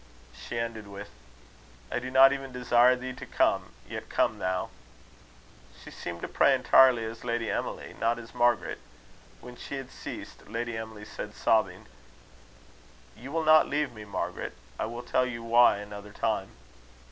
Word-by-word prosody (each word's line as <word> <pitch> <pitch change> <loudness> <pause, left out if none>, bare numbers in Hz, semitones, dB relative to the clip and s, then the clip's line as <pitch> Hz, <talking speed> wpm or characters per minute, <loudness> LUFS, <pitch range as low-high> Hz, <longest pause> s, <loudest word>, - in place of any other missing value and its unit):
She 120 - -7
ended 115 -2 -4
with: 100 +1 -9 0.8
"I - - 0
do 130 +1 -6
not 135 +1 +7
even 135 -1 -5
desire 125 0 +4
thee 130 +1 -6
to - - -9
come, - - +1
yet - - -7
come - - +1
thou." 95 0 -2 1.1
She - - -10
seemed 85 0 -7
to - - -2
pray 140 - +4
entirely 130 -2 +5
as 115 +1 -7
Lady 115 -1 -1
Emily, - - -4
not 115 +1 +1
as 115 0 -11
Margaret. 120 -6 +1 0.6
When 125 0 -10
she 140 - -7
had 135 -2 -7
ceased, - - -9
Lady 115 +2 -3
Emily 110 -1 -7
said, 105 0 -7
sobbing: 110 -1 +1 1.3
"You 130 +4 -10
will 165 +1 0
not 155 0 +6
leave 145 -3 0
me, 110 -2 -9
Margaret? 100 - -4 0.3
I - - -1
will 120 +2 -6
tell 125 +1 +1
you 115 -2 -6
why 115 -2 +5
another 105 0 -9
time." 105 -4 -1
120 Hz, 160 wpm, -28 LUFS, 110-125 Hz, 1.3 s, not